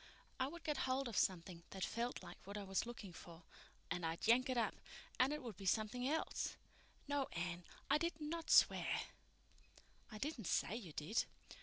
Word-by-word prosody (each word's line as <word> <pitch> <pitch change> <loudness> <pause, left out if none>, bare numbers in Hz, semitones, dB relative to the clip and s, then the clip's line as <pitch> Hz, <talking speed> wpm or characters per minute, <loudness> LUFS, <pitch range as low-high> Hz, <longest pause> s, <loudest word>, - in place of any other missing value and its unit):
I 260 - +2
would 340 +3 -8
get 300 -3 0
hold 260 +1 +2
of 230 - -4
something 180 -2 +1
that 190 -1 -4
felt 235 +1 -2
like - - -9
what 200 +2 -5
I 205 - -3
was 195 +3 0
looking 215 -6 -7
for, 165 0 -11 0.5
and 175 0 -1
I'd 165 0 -1
yank 250 +3 +6
it 255 - +1
up, 230 -2 +2 0.5
and 255 +2 +5
it 300 -2 -2
would 230 -5 -5
be 195 - -5
something 230 +6 +2
else. 320 +2 0 0.5
No, 285 -1 +1
Anne, 175 +1 -2 0.2
I 285 +2 +4
did 335 -1 -1
not 320 +2 -3
swear." - - +6 1.1
"I 215 - -6
didn't 240 - -3
say 205 - +2
you 205 -9 -6
did." 155 +11 +1
230 Hz, 185 wpm, -41 LUFS, 185-275 Hz, 1.1 s, yank